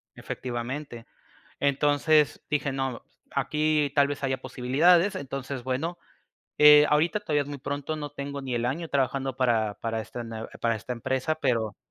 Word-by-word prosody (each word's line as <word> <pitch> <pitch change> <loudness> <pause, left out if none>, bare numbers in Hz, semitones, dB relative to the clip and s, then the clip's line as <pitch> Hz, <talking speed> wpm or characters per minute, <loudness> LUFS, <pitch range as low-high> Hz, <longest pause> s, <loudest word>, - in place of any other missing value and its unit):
Efectivamente. 120 0 -5 0.5
Entonces 145 +1 +2
dije: 145 -2 0
"No, 135 -3 -3 0.3
aquí 150 +1 +1
tal 140 -1 +5
vez 145 0 -5
haya 130 -1 0
posibilidades", 170 +11 +3
entonces, 135 -5 -5
bueno, 160 +7 -2 0.6
eh, 150 0 +9
ahorita 160 +7 +2
todavía 150 -3 0
es 140 - -10
muy 145 -1 -6
pronto, 145 +3 -4
no 145 -1 -5
tengo 140 0 -6
ni 130 -2 -4
el 120 0 -1
año 155 +7 -2
trabajando 135 -1 -1
para 115 -5 +1
para 115 -1 -2
esta 120 +2 -7
nuev 115 0 -7
para 115 -1 +1
esta 115 +4 -6
empresa, 130 +5 -1
pero 115 -8 0
140 Hz, 155 wpm, -27 LUFS, 125-150 Hz, 0.6 s, eh